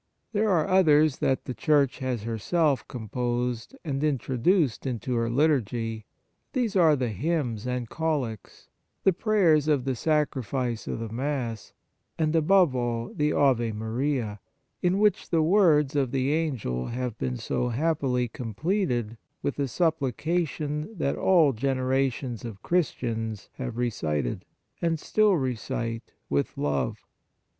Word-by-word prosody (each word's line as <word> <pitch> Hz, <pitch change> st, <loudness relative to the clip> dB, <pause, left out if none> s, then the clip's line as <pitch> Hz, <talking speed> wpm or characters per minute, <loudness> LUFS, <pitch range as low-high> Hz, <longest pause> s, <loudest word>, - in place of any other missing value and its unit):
There 215 Hz, +1 st, +2 dB
are 170 Hz, -5 st, +2 dB
others 155 Hz, -6 st, +4 dB
that 135 Hz, -, 0 dB
the 125 Hz, -, -4 dB
Church 140 Hz, +3 st, +2 dB
has 125 Hz, -5 st, -2 dB
herself 135 Hz, -, 0 dB
composed 120 Hz, -, -3 dB
and 140 Hz, -2 st, -2 dB
introduced 140 Hz, -, +1 dB
into 125 Hz, 0 st, -3 dB
her 115 Hz, -1 st, 0 dB
liturgy; 115 Hz, -5 st, 0 dB, 0.5 s
there 225 Hz, -8 st, +1 dB
are 160 Hz, -3 st, +6 dB
the 125 Hz, -3 st, -1 dB
hymns 125 Hz, -, -2 dB
and 125 Hz, -1 st, -2 dB
collects, 140 Hz, -8 st, -3 dB, 0.4 s
the 190 Hz, -, +5 dB
prayers 170 Hz, -7 st, +3 dB
of 145 Hz, -5 st, +2 dB
the 135 Hz, -1 st, 0 dB
Sacrifice 130 Hz, -5 st, -1 dB
of -, -, -2 dB
the 115 Hz, -1 st, -5 dB
Mass, 125 Hz, -2 st, -3 dB, 0.4 s
arid, 155 Hz, 0 st, +1 dB
above 165 Hz, -2 st, +4 dB
all, 120 Hz, -1 st, -2 dB
the 150 Hz, 0 st, +1 dB
Ave 120 Hz, -5 st, +2 dB
Maria, 110 Hz, 0 st, -2 dB, 0.4 s
in 180 Hz, +2 st, +2 dB
which 210 Hz, 0 st, +2 dB
the 165 Hz, -2 st, +3 dB
words 155 Hz, -6 st, +4 dB
of 135 Hz, -3 st, +2 dB
the 135 Hz, +2 st, 0 dB
Angel 120 Hz, -, -1 dB
have 125 Hz, -1 st, -3 dB
been 65 Hz, -1 st, -2 dB
so 125 Hz, -, -1 dB
happily 130 Hz, -2 st, 0 dB
com 115 Hz, -2 st, -7 dB
pleted 125 Hz, -, -1 dB, 0.3 s
with 140 Hz, -, -2 dB
a 140 Hz, -, +1 dB
supplication 155 Hz, -, -1 dB
that 140 Hz, -, 0 dB
all 165 Hz, -7 st, +4 dB
generations 130 Hz, -1 st, -1 dB
of 110 Hz, -5 st, -8 dB
Christians 115 Hz, -, -1 dB
have 125 Hz, -3 st, -5 dB
re 120 Hz, -1 st, 0 dB
cited, 75 Hz, -, -2 dB, 0.4 s
and 165 Hz, -2 st, +1 dB
still 210 Hz, +3 st, +3 dB
recite, 115 Hz, -3 st, -3 dB
with 70 Hz, 0 st, -1 dB
love. 70 Hz, -3 st, -1 dB
130 Hz, 135 wpm, -27 LUFS, 115-155 Hz, 0.5 s, are